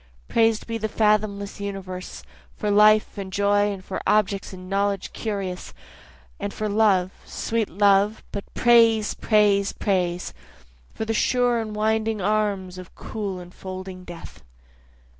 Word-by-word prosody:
Prais'd 225 -1 +2
be 230 -1 -4
the 220 0 -2
fathomless 210 -1 0
universe, 190 -2 -6 0.3
For 210 -2 -1
life 210 0 +4
and 190 -1 -6
joy, 205 +1 +2
and 195 -1 -8
for 190 - -4
objects 200 -2 +1
and 185 -1 -10
knowledge 200 0 -1
curious, 195 -5 -4 0.6
And 200 0 -3
for 215 - -3
love, 200 -3 +3
sweet 225 -2 -2
love 200 +3 +3
but 200 - -6
praise! 230 -3 +4
praise! 205 -2 +2
praise! 180 -3 -1 0.6
For 220 - -3
the 225 - -1
sure 245 +1 +2
enwinding 220 0 -1
arms 195 -2 -1
of 185 - -12
cool 200 -4 -5
enfolding 185 +1 -8
death. 175 -2 -11
205 Hz, 130 wpm, -24 LUFS, 190-215 Hz, 0.6 s, life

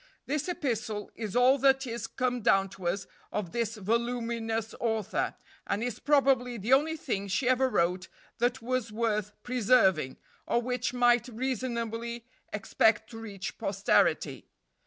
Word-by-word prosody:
This 300 +5 -2
epistle 230 - -2
is 215 -2 -5
all 255 +3 +5
that 270 0 +4
is 230 -2 -4
come 250 +1 -1
down 195 -1 +3
to 185 -2 -6
us 190 +3 -1 0.3
of 195 -5 -3
this 235 -1 -1
voluminous 230 +1 -1
author, 220 -4 -1 0.3
and 205 +3 -1
is 245 -2 -3
probably 270 -4 +3
the 225 +5 +1
only 315 +4 +3
thing 200 -9 -3
she 200 +7 0
ever 260 +1 +3
wrote 180 -3 +1 0.3
that 245 +1 0
was 250 -2 -1
worth 215 -2 -1
preserving, 210 - +3 0.3
or 235 - +2
which 250 +1 -1
might 245 -1 +3
reasonably 235 -1 -3 0.3
expect 220 +2 +2
to 225 - -8
reach 200 -4 -6
posterity. 195 0 +1
235 Hz, 140 wpm, -29 LUFS, 210-250 Hz, 0.3 s, all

